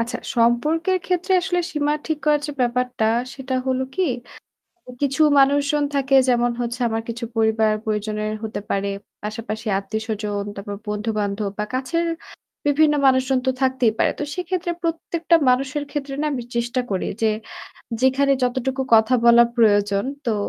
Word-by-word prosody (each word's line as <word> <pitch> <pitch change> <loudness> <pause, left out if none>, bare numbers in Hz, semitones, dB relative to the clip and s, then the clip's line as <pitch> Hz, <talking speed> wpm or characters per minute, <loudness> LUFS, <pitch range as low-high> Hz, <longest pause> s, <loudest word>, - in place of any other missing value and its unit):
আচ্ছা, 235 +2 -2 0.2
সম্পর্কের 305 +11 +2
ক্ষেত্রে 360 +1 0
আসলে 355 -1 0
সীমা 295 -1 +1
ঠিক 315 -2 -1
করার 300 -1 +3
যে 295 - -4
ব্যাপারটা 250 -1 0 0.3
সেটা 265 -1 -4
হলো 260 0 +1
কি? 375 - 0 1.0
কিছু 280 +2 +1 0.2
মানুষজন 285 +2 +3
থাকে 275 0 +2
যেমন 240 0 +2
হচ্ছে 240 +1 -3
আমার 225 0 -1
কিছু 235 +1 -4
পরিবার 220 -1 +2
পরিজনের 215 0 -2
হতে 220 -1 -4
পারে। 200 0 0 0.3
পাশাপাশি 220 +1 -5
আত্মীয়স্বজন, 210 0 -3
তারপর 200 0 -6
বন্ধুবান্ধব 210 -1 -2
বা 210 - 0
কাছের 330 +7 -1 0.6
বিভিন্ন 295 +1 +4
মানুষজন 260 0 +3
তো 260 - +3
থাকতেই 260 -4 +2
পারে। - - +3
তো - - -1
সেক্ষেত্রে 360 0 -2
প্রত্যেকটা 335 0 +1
মানুষের 270 +3 +1
ক্ষেত্রে 275 -2 -4
না - - 0
আমি 250 -3 -3
চেষ্টা 240 +2 0
করি 190 - -1
যে 220 - +4 0.7
যেখানে 270 +2 +3
যতটুকু 260 +2 -1
কথা 220 +3 +4
বলার 235 0 +7
প্রয়োজন 205 -2 +3 0.2
তো 230 - +1
250 Hz, 145 wpm, -22 LUFS, 220-285 Hz, 1.0 s, বলার